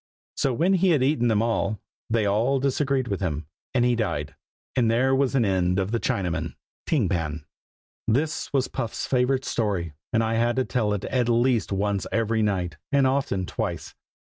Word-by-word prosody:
So 135 - +1
when 170 +10 +2
he 190 0 +3
had 150 -7 +3
eaten 135 -3 +2
them 110 -1 +2
all, 115 -2 0 0.3
they 110 -2 +2
all 115 +7 +2
disagreed 135 -1 0
with 100 -4 -2
him, 80 -5 -2 0.3
and 120 -1 +4
he 125 0 +3
died. 75 - -2 0.4
And 120 -3 +3
there 130 +4 +3
was 135 0 +2
an 125 -4 +3
end 90 -2 +1
of 95 +1 0
the 115 - +1
Chinaman, 90 -6 -2 0.3
Ting 135 - +2
Pan. 80 -4 -2 0.6
This 145 +8 0
was 135 -2 +1
Puff's 115 -4 -4
favorite 130 +1 +1
story, 95 -8 -1 0.2
and 115 -1 +2
I 110 0 0
had 120 +1 +2
to 130 -1 +1
tell 110 -4 0
it 100 - -3
at 125 -2 0
least 120 -2 +2
once 100 0 0
every 115 0 +1
night, 90 -6 -1
and 140 -2 +4
often 130 -8 0
twice. - - -4
115 Hz, 185 wpm, -25 LUFS, 100-130 Hz, 0.6 s, and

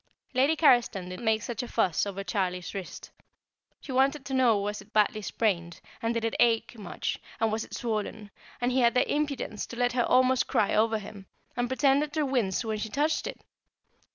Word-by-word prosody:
Lady 270 +5 +3
Carriston 240 - +3
did 185 - -7
make 220 -2 +1
such 235 -3 -4
a 245 - -6
fuss 195 -6 +1
over 195 0 -4
Charlie's 180 -1 -2
wrist. 195 -3 -7 0.7
She 275 - -8
wanted 270 +2 +2
to 270 - -5
know 250 -5 +4
was 205 +1 -3
it 215 - -18
badly 215 0 +2
sprained, 175 -6 -1 0.2
and 230 - 0
did 230 -1 -1
it 225 - -1
ache 230 0 +2
much, 205 -6 -4 0.2
and 225 -1 +2
was 220 +1 -1
it - - -9
swollen, 215 -2 -3 0.3
and 245 +1 0
he 260 - +2
had 235 -1 +3
the 250 - +3
impudence 285 -7 -2
to 235 - -9
let 245 0 +1
her 250 - +2
almost 255 +1 +3
cry 205 - +1
over 220 +1 +3
him, 200 -2 -10 0.3
and 245 0 0
pretended 280 +2 +2
to 310 -2 +1
wince 240 -6 0
when 215 -1 -2
she 220 - -3
touched 295 +8 0
it! - - -7
225 Hz, 200 wpm, -28 LUFS, 205-255 Hz, 0.7 s, know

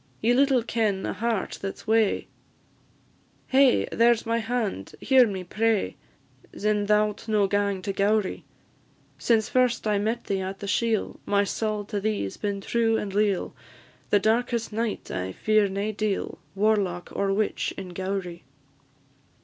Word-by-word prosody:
Ye 235 +2 +3
little 265 -2 +3
ken 215 -5 0
a - - -2
heart 230 -3 -2
that 195 -1 -4
's - - -15
wae; 220 -1 +2 1.2
Hae! 265 -1 +4
there 235 +1 +5
's 225 - -9
my 230 +1 +1
hand; 225 - -3
hear 260 -3 +5
me, 195 -3 -4
I - - -8
pray, 220 +3 0 0.6
Sin' 210 -1 0
thou 210 0 +4
'lt 210 - -10
no 210 -2 +3
gang 200 -1 0
to 200 - -2
Gowrie: 205 0 +1 0.8
Since 225 -2 +2
first 250 -2 +2
I 210 -1 +2
met 225 +3 -1
thee 195 -1 -2
at 190 +1 -4
the 200 - -7
shiel, 220 +1 0
My 200 0 +3
saul 210 +1 -2
to 205 -1 -3
thee 210 - -1
's - - -8
been 200 -1 -3
true 225 +1 +1
and 200 -3 -4
leal; 205 -2 +1 0.6
The 205 - +5
darkest 230 +2 0
night 225 0 -3
I 95 0 -3
fear 215 - +2
nae 200 +3 -2
deil, 215 -1 -2 0.2
Warlock, 195 -4 0
or 200 0 0
witch 205 +1 0
in 190 -2 -6
Gowrie. 185 -1 -4
210 Hz, 165 wpm, -26 LUFS, 195-225 Hz, 1.2 s, there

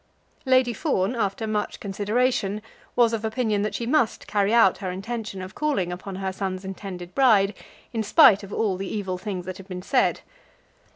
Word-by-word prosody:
Lady 255 -2 +4
Fawn, 195 +2 0
after 220 -1 -1
much 215 -1 -2
consideration, 210 +1 0 0.3
was 235 -2 +4
of 225 -1 -2
opinion 220 -2 0
that 210 - -2
she 235 - -3
must 240 -3 +1
carry 205 -1 +1
out 225 -5 +5
her 190 -2 -3
intention 200 +1 -5
of 185 +2 -9
calling 270 -13 -1
upon 185 +2 -6
her 190 0 -3
son's 190 -1 -4
intended 185 -2 -7
bride 215 -7 +4 0.4
in 225 - 0
spite 205 -1 +6
of 200 -1 -10
all 200 -4 0
the 195 0 -5
evil 190 -4 -3
things 185 -2 -5
that 185 0 -6
had 195 - -12
been 180 -2 -6
said. 260 +3 +2
205 Hz, 180 wpm, -25 LUFS, 190-225 Hz, 0.4 s, spite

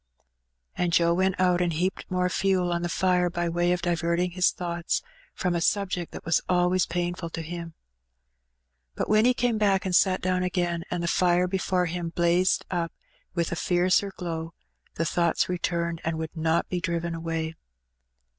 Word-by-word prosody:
And 175 -1 0
Joe 170 0 +4
went 190 +1 +1
out, 180 -1 +3
and 175 -2 +1
heaped 180 +4 -2
more 180 -1 +1
fuel 180 -1 +1
on 170 - -1
the 175 - -2
fire 180 0 +2
by 175 0 -2
way 175 +1 +1
of 180 0 -1
diverting 170 +1 0
his 180 +1 +3
thoughts 170 -1 -2 0.3
from 180 -2 0
a 170 - 0
subject 180 -2 0
that - - -9
was 165 0 +2
always 180 0 +2
painful 175 0 -2
to 165 0 -5
him. 170 0 -7 1.2
But - - -2
when 215 +1 +4
he 250 0 +4
came 235 -3 +1
back 195 -3 +2
and 185 -2 +1
sat 185 0 +4
down 185 0 0
again, 175 -2 -1
and 175 -1 -2
the - - -1
fire 180 +1 +3
before 185 -1 0
him 175 0 -3
blazed 175 +2 +2
up 170 -2 -1 0.4
with 170 -2 0
fiercer 180 +3 +2
glow, 165 -2 -5 0.4
the 165 - -1
thoughts 170 -1 +1
returned, 170 -2 -2
and 165 0 -1
would 160 +1 -5
not 160 +1 +1
be 180 - -2
driven 170 -1 -2
I - - -4
away. 165 -1 -3
175 Hz, 180 wpm, -26 LUFS, 170-180 Hz, 1.2 s, Joe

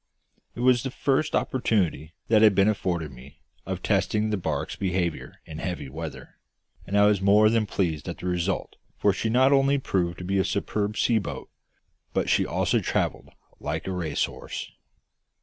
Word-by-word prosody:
It - - -5
was 125 -1 +4
the 130 - -3
first 140 +4 0
opportunity 95 - 0
that 110 -1 +4
had 105 -3 +6
been 100 +1 +4
afforded 90 -7 -1
me 65 +3 -15 0.2
of - - -4
testing 110 0 +1
the - - +2
barque's 95 - -3
behaviour 90 -3 -2
in 80 -1 -8
heavy 85 -7 -4
weather, 80 +2 -8 0.5
and 100 - 0
I 100 - +6
was 105 -2 +3
more 105 +2 +5
than 115 -2 +1
pleased 80 -8 -2
at - - -5
the - - -9
result, 90 +1 -2 0.2
for 100 - +3
she 110 - -2
not 130 +4 +4
only 135 +1 +4
proved 90 -9 -1
to 90 - -7
be 95 +2 0
a - - +3
superb 105 +2 -2
sea 115 -2 +3
boat, 100 - -7 0.6
but - - +1
she - - +3
also - - +1
travelled - - -2 0.3
like 75 +2 -3
a 95 - -3
racehorse. 90 -4 -3
100 Hz, 175 wpm, -26 LUFS, 85-110 Hz, 0.6 s, had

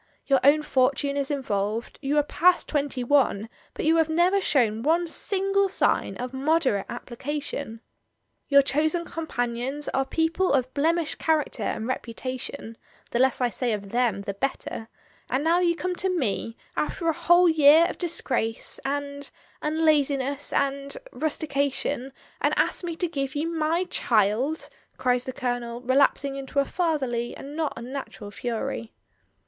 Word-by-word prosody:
Your 275 -2 +4
own 295 +3 +5
fortune 280 +1 +1
is 280 -1 -1
involved, 225 -5 -2
you 290 +1 0
are 295 - +5
past 350 +4 +3
twenty 280 -4 -1
one, 245 -5 +2 0.3
but - - -3
you 325 +1 +4
have 320 -1 +3
never 355 +5 +3
shown 225 - +2
one 330 +6 +2
single 390 +3 0
sign 385 - +1
of 250 +1 -5
moderate 265 -7 +1
application. 260 -1 -5 0.7
Your 280 -1 +6
chosen 315 +5 +1
companions 265 -3 -3
are 270 - +1
people 325 +5 +1
of 260 -1 +1
blemished 320 +2 0
cha 320 - +3
racter 305 -3 -2 0.2
and 220 +1 -4
reputation 255 -1 -5 0.2
— - - -31
the 235 - 0
less 260 0 +3
I 245 - +3
say 240 0 -1
of 200 -2 -5
them 235 -4 +1
the 200 -1 -3
better 225 0 -3 0.2
— - - -33
and 260 +3 0
now 335 +2 +3
you 345 -1 +2
come 365 +1 -2
to 380 - 0
me, 235 - -1 0.2
after 335 - -2
a 325 - +3
whole 345 +3 +5
year 315 0 +7
of - - -7
disgrace 250 -9 -1
and 285 0 -3 0.2
— - - -32
and 315 +2 0
laziness 280 -2 +1
and 280 - -1
— - - -16
rustica 285 -2 -1
tion, 270 0 -3 0.3
and - - +1
ask - - +1
me 340 -2 -3
to 350 +1 -1
give 275 -4 -3
you 300 +3 -1
my 320 +3 +1
child," 235 - +1 0.3
cries 250 -1 +1
the 260 - -3
Colonel, 245 -3 -3
relapsing 275 +2 +2
into 275 +1 -7
a 280 - +4
fatherly 265 -9 -1
and 285 +2 -9
not 315 -2 -1
unnatural 240 -4 -7
fury. 230 +1 -4
280 Hz, 165 wpm, -26 LUFS, 245-315 Hz, 0.7 s, year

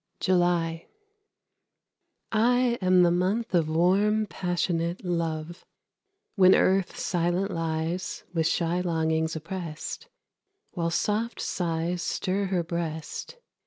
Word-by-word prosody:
JULY. 175 -2 +1 1.4
I 235 +3 +3 0.2
am 185 -1 +5
the 175 - +4
month 190 +6 0
of 165 -3 +2
warm, 195 +6 +3
passionate 175 -2 -2
love, 170 -1 -3 0.7
When 185 -2 +6
Earth 190 0 +2
silent 175 +2 0
lies, 165 +2 -3
with 160 -2 +1
shy 170 +1 0
longings 160 -2 0
opprest, 165 - -6 0.6
While 170 -2 -1
soft 215 +7 -1
sighs 170 0 -2
stir 190 +3 -1
her 185 -2 0
breast. 165 - -5
175 Hz, 100 wpm, -27 LUFS, 165-190 Hz, 1.4 s, When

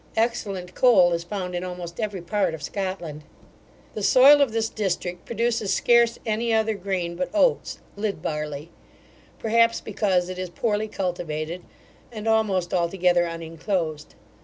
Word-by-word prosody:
Excellent 200 -6 -1
coal 190 -9 +5
is 170 0 -2
found 180 0 -5
in 175 0 -3
almost 180 -2 -7
every 205 -5 -3
part 200 -2 0
of 150 - -11
Scotland. 185 -5 -4 0.7
The 215 - -5
soil 275 +7 +7
of 275 -5 +3
this 225 0 0
district 180 -4 -3
produces 230 -2 0
scarce 235 -1 +4
any 230 +1 0
other 220 0 +2
grain 185 -3 -3
but 180 +1 -2
oats, 475 +10 +2 0.2
lid 205 -3 -2
barley; 150 0 -4 0.7
perhaps 230 +1 +3
because 185 -4 0
it 185 0 -6
is 185 -1 -4
poorly 215 +3 -1
cultivated, 175 -4 -4 0.5
and 220 -1 -6
almost 205 -5 +1
altogether 175 0 +2
uninclosed. 165 -1 -4
190 Hz, 140 wpm, -24 LUFS, 175-220 Hz, 0.7 s, soil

